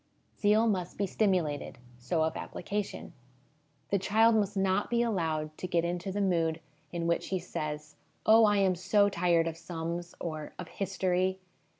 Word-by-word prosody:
Zeal 215 +2 +3
must 185 -6 -1
be 200 - +1
stimulated. 180 -8 0 0.2
So 145 +7 0
of 160 0 -1
application. 205 +2 -4 0.8
The 200 - +3
child 220 +4 +4
must 205 -2 +1
not 195 +1 +1
be 235 0 +2
allowed 160 -8 -1
to 185 - -3
get 170 -1 +1
into 175 +2 -2
the 205 +2 -1
mood 190 -2 +2
I$O 170 - +2
HOME 165 - +2
EDUCATION 160 +1 -7
in - - -1
which 170 - 0
he 190 - 0
says, 150 -4 -5 0.3
'Oh, 220 +1 +7
I 205 -1 +3
am 195 -2 +3
so 200 +3 +3
tired 170 -3 +2
of 165 -1 -4
sums,' 170 0 -5
or 155 -3 -5
'of 180 -2 -7
history.' 185 -1 0
180 Hz, 180 wpm, -30 LUFS, 165-200 Hz, 0.8 s, Oh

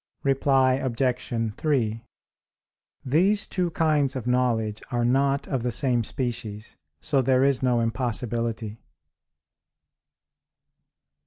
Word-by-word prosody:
Reply 135 -1 +3
Obj. 120 -3 -1
3: 115 -7 0 1.0
These 185 +10 +2
two 180 -2 -1
kinds 150 -5 +1
of 130 - -4
knowledge 115 -4 0
are 120 -1 0
not 135 +3 +1
of 135 -4 -2
the 125 - -1
same 120 0 0
species, 110 -3 -4 0.2
so 140 - +1
there 130 0 +3
is 135 -2 +2
no 125 -2 +2
impossibility. 115 -2 -2
125 Hz, 100 wpm, -25 LUFS, 115-135 Hz, 1.0 s, Reply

